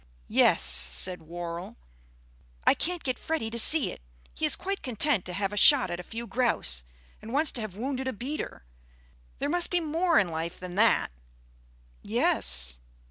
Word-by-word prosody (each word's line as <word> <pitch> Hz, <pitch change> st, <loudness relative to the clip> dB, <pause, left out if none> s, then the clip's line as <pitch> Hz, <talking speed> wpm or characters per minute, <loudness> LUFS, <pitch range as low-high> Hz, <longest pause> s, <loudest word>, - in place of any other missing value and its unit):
"Yes," -, -, +4 dB
said 65 Hz, -, +3 dB
Worrall. 170 Hz, +2 st, -7 dB, 0.9 s
"I -, -, +6 dB
can't 355 Hz, 0 st, -2 dB
get 255 Hz, -2 st, -2 dB
Freddy 315 Hz, -9 st, -3 dB
to 235 Hz, -, 0 dB
see 305 Hz, +4 st, +5 dB
it. -, -, -11 dB, 0.3 s
He 315 Hz, -, 0 dB
is 295 Hz, -, -1 dB
quite 390 Hz, +1 st, -4 dB
content 250 Hz, -3 st, 0 dB
to 180 Hz, -, -6 dB
have 195 Hz, +1 st, -2 dB
shot 280 Hz, +1 st, +6 dB
a 175 Hz, +1 st, -4 dB
few 230 Hz, +6 st, -7 dB
grouse... 230 Hz, -, 0 dB, 0.4 s
and 225 Hz, -, -9 dB
once 295 Hz, +3 st, +3 dB
to 240 Hz, -, -3 dB
have 215 Hz, -4 st, -6 dB
wounded 260 Hz, +2 st, -3 dB
a 260 Hz, -, -2 dB
beater. 245 Hz, -, -6 dB, 0.7 s
There 280 Hz, -, -2 dB
must 345 Hz, +3 st, +1 dB
be 355 Hz, -, +1 dB
more 330 Hz, +1 st, +1 dB
in 185 Hz, -, +3 dB
life 165 Hz, +1 st, -5 dB
than 180 Hz, -1 st, -8 dB
that." 215 Hz, -, +2 dB, 0.9 s
"Yes." -, -, +2 dB
230 Hz, 165 wpm, -27 LUFS, 175-290 Hz, 0.9 s, I